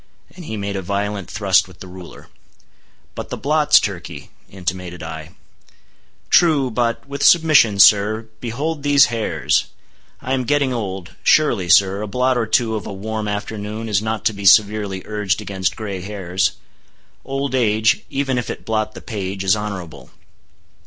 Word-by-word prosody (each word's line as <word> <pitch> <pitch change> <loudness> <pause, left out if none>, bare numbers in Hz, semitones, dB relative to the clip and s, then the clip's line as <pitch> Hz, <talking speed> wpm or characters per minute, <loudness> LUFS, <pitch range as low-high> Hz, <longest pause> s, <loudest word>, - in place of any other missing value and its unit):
—and 180 -3 -10
he 110 - -5
made 100 0 -4
a 95 - -2
violent 100 +1 -3
thrust 95 -3 +2
with 90 -1 -17
the - - -9
ruler. 90 -1 -12 0.9
"But - - -7
the - - -5
blots, 150 +1 +4
Turkey," 90 -4 -6 0.2
intimated 90 -2 -5
I. 80 0 -8 1.0
"True,—but, 130 -9 +2
with 140 0 -6
submission, 155 - +5
sir, 105 +3 +5
behold 140 +7 -3
these 140 -4 +4
hairs! 115 -2 0 0.5
I 130 - -3
am 130 -2 -1
getting 140 0 +1
old. 95 -6 -5
Surely, 115 -13 +2
sir, 95 +3 +4
a 105 - -4
blot 125 +4 +1
or 115 -2 -1
two 110 0 +1
of 110 - -4
a - - -6
warm 110 +2 -4
afternoon 105 +1 -5
is 105 -2 +1
not 110 0 -3
to 110 - +2
be 100 0 -8
severely 105 -2 +3
urged 105 -5 -1
against 95 -3 -3
gray 100 -4 -5
hairs. 95 -2 -2 0.7
Old 135 0 -3
age—even 120 +3 +1
if 120 - -5
it - - -7
blot 110 -1 -2
the - - -9
page—is 95 -3 -1
honorable. 100 -6 -7
105 Hz, 150 wpm, -19 LUFS, 95-120 Hz, 1.0 s, submission